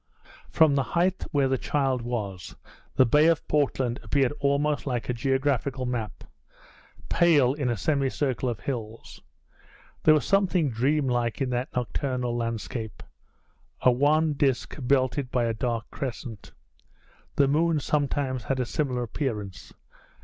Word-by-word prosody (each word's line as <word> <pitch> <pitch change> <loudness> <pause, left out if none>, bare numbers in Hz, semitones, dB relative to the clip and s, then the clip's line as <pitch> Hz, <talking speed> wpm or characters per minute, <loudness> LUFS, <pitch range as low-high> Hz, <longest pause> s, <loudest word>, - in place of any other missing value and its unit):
From 160 -3 +4
the 140 - +2 0.2
height 185 +2 +1
where 140 -3 +2
the 130 -1 0
child 135 -4 0
was 105 -7 -5 0.4
the 130 - +6
bay 150 +6 +4
of 165 -2 +1
Portland 135 -4 0
appeared 135 -3 +1
almost 145 +1 0
like 125 -3 -2
a - - +1
geographical 135 +1 0
map, 115 -5 -4 0.8
pale, 145 -7 +4
in 140 -3 -2
a 120 - -1
semicircle 135 -1 0
of 110 -4 -5
hills. 115 -4 -6 0.8
There 155 - +6
was 150 - 0
something 185 -7 +2
dreamlike 125 -1 0
in 135 -2 -1
that 125 +1 -2
nocturnal 125 0 -2
landscape 115 -2 -4 0.8
a 125 - +5
wan 150 +5 +2
disc 135 -3 0
belted 130 +1 +1
by 125 -2 +1
a 115 - 0
dark 115 0 -2
crescent. 120 -5 -6 0.8
The 140 - +4
moon 160 +2 +2
sometimes 140 -4 -1
has 135 -1 -1
a 125 - 0
similar 125 -2 -1
appearance. 105 -7 -4
130 Hz, 135 wpm, -26 LUFS, 120-145 Hz, 0.8 s, the